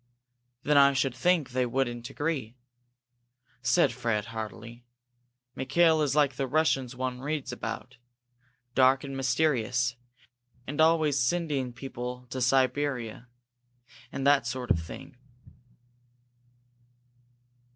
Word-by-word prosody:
"Then 150 0 +3
I 140 0 +7
should 135 -1 0
think 160 +2 +1
they 125 0 0
wouldn't 120 -1 -2
agree," 145 -7 -3 1.1
said 170 +7 +3
Fred, 115 -5 -1
heartily. 110 +2 -7 0.7
"Mikail 160 +5 +3
is 145 -2 +1
like 140 -4 +2
the 135 - -1
Russians 135 -3 +1
one 130 0 -3
reads 145 0 -3
about, 115 +3 -6 0.8
dark 130 +1 +4
and 135 -1 -6
mysterious, 125 -3 +1 0.7
and 145 +3 -1
always 160 -3 +3
sending 140 -2 0
people 125 0 -7
to 130 - -3
Siberia 130 -2 0 0.8
and 135 - -4
that 140 -3 +4
sort 125 0 -3
of - - +3
thing." 135 - -10
130 Hz, 110 wpm, -28 LUFS, 125-145 Hz, 1.1 s, I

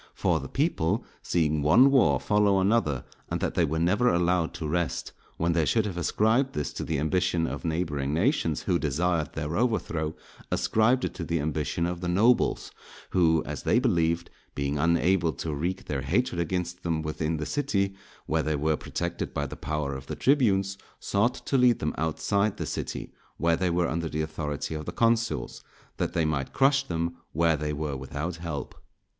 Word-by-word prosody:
For - - +1
the - - -7
people 135 - 0 0.2
seeing 75 -3 +1
one 105 - +6
war 135 -3 +4
follow 105 -2 +3
another, 95 - +1 0.2
and - - -1
that - - -1
they 85 - +2
were 80 0 0
never 95 +9 +3
allowed 85 -1 +2
to 80 - -4
rest, 85 +2 -1 0.3
when 85 +1 +1
they 80 -1 +2
should 110 +8 +2
have 100 -4 -3
ascribed 110 +9 +2
this 75 -3 -2
to - - -4
the 80 - -1
ambition 85 +2 +1
of - - -4
neighbouring 80 -4 -1
nations 85 - +1
who 90 -3 +1
desired 80 +1 0
their 80 +1 -3
overthrow, 85 -9 0 0.4
ascribed 120 +4 +2
it - - -4
to 90 - -5
the 85 0 -1
ambition 75 +3 -1
of 90 0 -3
the 90 - -2
nobles, 105 +8 +2 0.4
who, 80 -3 +3
as - - -5
they - - +2
believed, 85 -8 +1 0.2
being 70 +1 -1
unable 85 +1 +2
to 80 +4 -4
wreak 90 +6 -3
their 70 -2 -2
hatred 85 - 0
against 90 +1 -3
them 80 -3 -1
within 80 +1 -2
the 75 - -3
city, 100 - 0 0.3
where 80 +1 +1
they 80 0 -1
were 75 +2 +1
protected 85 +3 -4
by 70 - 0
the - - -7
power 75 -1 -3
of 65 0 -7
the - - -4
tribunes, 100 -8 +2 0.2
sought 115 +5 +1
to 135 +1 -1
lead 125 -2 +5
them 75 - -2
outside 80 +7 0
the - - -3
city, - - -5 0.2
where 85 0 +2
they 90 +1 0
were 85 0 +1
under 85 0 -2
the 75 - -2
authority 80 -1 -4
of 75 -1 -5
the - - -2
consuls, 115 0 0 0.3
that - - -1
they 80 - +1
might 70 -4 -2
crush 135 +1 +4
them 85 -9 -3 0.2
where 80 +1 +3
they 75 0 -2
were 75 -1 -3
without 75 +6 -4
help. 80 -4 -5
85 Hz, 185 wpm, -27 LUFS, 75-100 Hz, 0.4 s, one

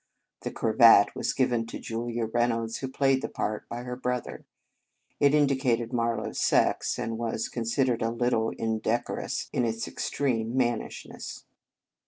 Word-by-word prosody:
The - - -4
cravat 110 -2 +5
was - - -1
given 120 -3 +1
to - - -6
Julia 115 0 -3
Reynolds, 115 0 0
who 135 - -4
played 135 0 +2
the - - -3
part, 105 0 -3
by 120 +1 -5
her 125 0 -5
brother. 125 -1 -4 0.7
It 145 0 +5
indicated 130 -5 +1
Marlow 115 -1 0
s - - -6
sex, - - +2
and 115 0 -3
was 115 -1 -2
considered 120 +1 0
a 115 - +1
little 115 -1 +1
indecorous 115 +1 -2
in 125 - +1
its 115 -1 -2
ex - - -4
treme 115 -5 -1
mannishness. 120 -3 -3
120 Hz, 150 wpm, -27 LUFS, 115-125 Hz, 0.7 s, cravat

